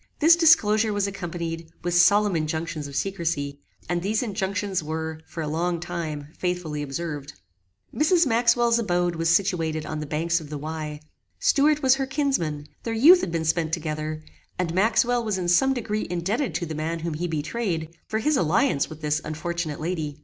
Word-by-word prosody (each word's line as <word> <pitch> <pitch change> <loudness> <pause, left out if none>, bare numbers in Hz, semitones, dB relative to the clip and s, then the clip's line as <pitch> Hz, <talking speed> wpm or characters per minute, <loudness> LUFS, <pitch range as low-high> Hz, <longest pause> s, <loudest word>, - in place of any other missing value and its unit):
This 325 +2 +6
disclosure 225 -11 +4
was 205 -1 0
accompanied 170 -4 -5
with 175 0 -1
solemn 200 +3 +5
injunctions 160 -1 -2
of 140 - -9
secrecy, 160 -6 -2 0.3
and 175 0 -1
these 215 +5 0
injunctions 200 -3 -2
were, 160 0 -4
for 165 - -5
a - - -3
long 170 +3 -1
time, 160 -4 -5
faithfully 175 -5 -2
observed. 145 0 -5 0.6
Mrs. 330 +3 +3
Maxwell's 235 -1 +3
abode 175 -5 0
was 165 0 0
situated 165 -4 +1
on 155 - -4
the 150 - -5
banks 165 +3 0
of 150 - -10
the 150 - -4
Wey. 155 0 -5 0.4
Stuart 295 +1 +3
was 260 -1 +6
her 270 -1 -1
kinsman; 265 - -1 0.2
their 225 -1 -3
youth 330 +11 +7
had 170 - -3
been 165 -1 -1
spent 160 0 0
together; 155 -1 -3 0.3
and 175 -2 -1
Maxwell 235 +5 +2
was 215 -3 -1
in 180 -2 -2
some 220 +10 +4
degree 215 -4 -2
indebted 195 - -1
to 175 - -1
the 160 - -5
man 155 +2 -2
whom 165 -1 -3
he 170 +4 -2
betrayed, 165 0 -3
for 220 - -1
his 300 +7 +1
alliance 180 - +2
with 155 0 -10
this 150 0 0
unfortunate 160 0 -4
lady. 155 -3 -3
170 Hz, 180 wpm, -25 LUFS, 155-215 Hz, 0.6 s, youth